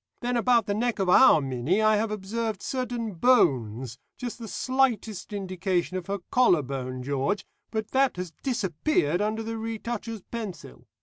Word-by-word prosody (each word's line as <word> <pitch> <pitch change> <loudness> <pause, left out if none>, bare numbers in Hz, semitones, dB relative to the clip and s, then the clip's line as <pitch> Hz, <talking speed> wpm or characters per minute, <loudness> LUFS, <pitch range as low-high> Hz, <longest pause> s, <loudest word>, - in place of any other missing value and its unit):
Then 245 +1 -1
about 235 -2 +3
the 205 - -1
neck 235 +3 0
of 190 -3 0
our 180 - +7
Minnie 135 - 0
I 215 0 +4
have 220 +1 0
observed 215 +1 -3
certain 245 -4 -3
bones, 130 - +2 0.2
just 245 -1 -5
the 230 - -7
slightest 235 -5 0
indication 185 -2 -2
of 185 -2 -4
her 200 +1 -1
collar 210 - +4
bone, 130 -1 -5
George, 140 +8 -1 0.2
but 220 -1 -3
that 270 0 +3
has 180 -2 -5
disappeared 190 - 0
under 215 +2 -1
the 225 0 -4
retoucher's 225 -1 -4
pencil. 200 - -7
210 Hz, 160 wpm, -27 LUFS, 175-230 Hz, 0.2 s, our